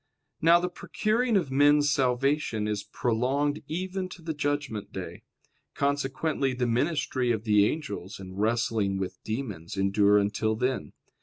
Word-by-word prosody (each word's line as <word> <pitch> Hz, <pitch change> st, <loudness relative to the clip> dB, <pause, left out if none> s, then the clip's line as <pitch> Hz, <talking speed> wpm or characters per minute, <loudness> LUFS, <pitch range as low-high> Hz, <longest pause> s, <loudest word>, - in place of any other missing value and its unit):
Now 165 Hz, +2 st, +6 dB
the 180 Hz, -, -1 dB
procuring 220 Hz, +5 st, 0 dB
of 160 Hz, -8 st, -1 dB
men's 145 Hz, +1 st, +4 dB
salvation 130 Hz, -4 st, +1 dB
is 105 Hz, -2 st, -1 dB
prolonged 135 Hz, +5 st, 0 dB
even 185 Hz, +2 st, -3 dB
to 180 Hz, -2 st, -11 dB
the 160 Hz, 0 st, -3 dB
judgment 145 Hz, -7 st, -2 dB
day: -, -, -7 dB, 0.5 s
consequently, 140 Hz, 0 st, 0 dB
the 125 Hz, 0 st, 0 dB
ministry 130 Hz, 0 st, 0 dB
of 110 Hz, -2 st, -1 dB
the 105 Hz, -2 st, +4 dB
angels 150 Hz, -, -5 dB
and 95 Hz, +1 st, -6 dB
wrestling 110 Hz, -3 st, +1 dB
with 95 Hz, -1 st, -5 dB
demons 105 Hz, -8 st, -5 dB
endure 100 Hz, +1 st, +4 dB
until 105 Hz, +2 st, +1 dB
then. 125 Hz, +3 st, -2 dB
130 Hz, 140 wpm, -27 LUFS, 105-150 Hz, 0.5 s, Now